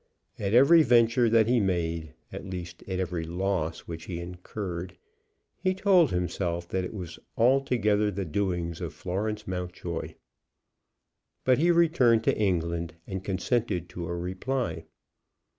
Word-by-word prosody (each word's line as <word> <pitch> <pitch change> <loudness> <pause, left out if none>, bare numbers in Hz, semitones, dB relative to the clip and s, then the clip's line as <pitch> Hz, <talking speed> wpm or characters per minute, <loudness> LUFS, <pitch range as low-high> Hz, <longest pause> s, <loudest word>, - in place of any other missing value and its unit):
At 100 +2 0
every 140 +7 +7
venture 120 -2 +4
that 115 -1 +5
he 120 +2 +3
made, 85 -5 -1 0.2
at - - -6
least 90 -3 -7
at 95 -1 -2
every 90 -3 -2
loss 85 -1 -2
which 85 0 -8
he 85 -3 -5
incurred, 90 0 -6 0.6
he 185 -1 +1
told 185 -5 +4
himself 90 -1 -2
that 95 0 -1
it 90 - -6
was 90 -4 -7 0.2
altogether 115 -4 +3
the 100 -1 -3
doings 85 -1 -2
of - - -5
Florence 105 +3 -3
Mountjoy. 90 -1 -4 1.3
But 130 0 +3
he 170 +3 +3
returned 155 -10 +4
to - - +2
England, 85 -4 -1
and 95 -1 -5
consented 95 -2 -1
to 90 -2 -6
a 85 - -3
reply. 95 +1 -3
95 Hz, 140 wpm, -28 LUFS, 85-115 Hz, 1.3 s, every